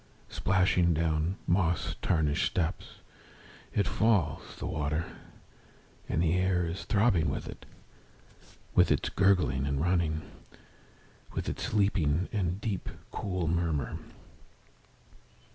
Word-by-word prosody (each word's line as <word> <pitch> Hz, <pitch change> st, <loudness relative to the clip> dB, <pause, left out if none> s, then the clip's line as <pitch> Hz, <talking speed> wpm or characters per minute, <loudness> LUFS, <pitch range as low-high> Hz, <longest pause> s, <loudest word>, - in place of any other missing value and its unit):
Splashing 90 Hz, -2 st, +2 dB
down 80 Hz, +3 st, 0 dB
moss 85 Hz, -1 st, +1 dB
tarnished 80 Hz, -4 st, +2 dB
steps 85 Hz, -4 st, -2 dB, 0.8 s
It 100 Hz, -, +1 dB
falls, 100 Hz, -10 st, +1 dB
the -, -, -6 dB
water; 75 Hz, +1 st, -1 dB, 1.0 s
And 80 Hz, -, +1 dB
the 80 Hz, -1 st, +2 dB
air 90 Hz, -1 st, +2 dB
is 85 Hz, +4 st, -5 dB
throbbing 100 Hz, -8 st, +3 dB
with -, -, -4 dB
it. -, -, -10 dB, 1.1 s
With -, -, +5 dB
its -, -, +1 dB
gurgling 90 Hz, -9 st, +2 dB
and 70 Hz, -1 st, -1 dB
running. 80 Hz, -2 st, +1 dB, 1.1 s
With -, -, -2 dB
its -, -, -3 dB
leaping, 90 Hz, -5 st, +2 dB
and 95 Hz, -3 st, -1 dB
deep, 105 Hz, -3 st, -3 dB, 0.2 s
cool 90 Hz, -4 st, -2 dB
murmur. 80 Hz, -5 st, -1 dB
85 Hz, 110 wpm, -30 LUFS, 80-95 Hz, 1.1 s, With